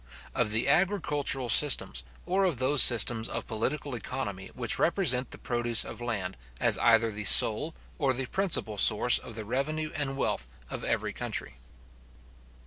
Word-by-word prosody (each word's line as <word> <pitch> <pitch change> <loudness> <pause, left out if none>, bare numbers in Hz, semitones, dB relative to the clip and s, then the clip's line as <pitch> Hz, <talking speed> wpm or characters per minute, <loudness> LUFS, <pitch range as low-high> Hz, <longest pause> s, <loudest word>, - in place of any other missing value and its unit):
OF 120 -3 -1
THE 110 +3 -1
AGRICULTURAL 150 -6 0
SYSTEMS, 120 - +4 0.2
OR 190 +2 -1
OF 170 -8 -2
THOSE 130 +3 +4
SYSTEMS 115 -1 +6
OF - - -6
POLITICAL 135 +5 -4
ECONOMY 110 -5 -7
WHICH 120 -3 0
REPRESENT 145 -8 0
THE - - -9
PRODUCE 120 -1 0
OF - - -10
LAND, 100 - -5 0.2
AS - - +3
EITHER 115 0 +2
THE 105 0 -6
SOLE 145 +12 +5 0.2
OR 140 -4 0
THE 130 +1 -3
PRINCIPAL 125 - -2
SOURCE 115 +4 +4
OF 115 - -12
THE 110 -1 -7
REVENUE 155 +7 -4
AND 135 -2 -4
WEALTH - - -3 0.2
OF - - -6
EVERY - - -3
COUNTRY. - - -7
125 Hz, 155 wpm, -27 LUFS, 110-145 Hz, 0.2 s, SYSTEMS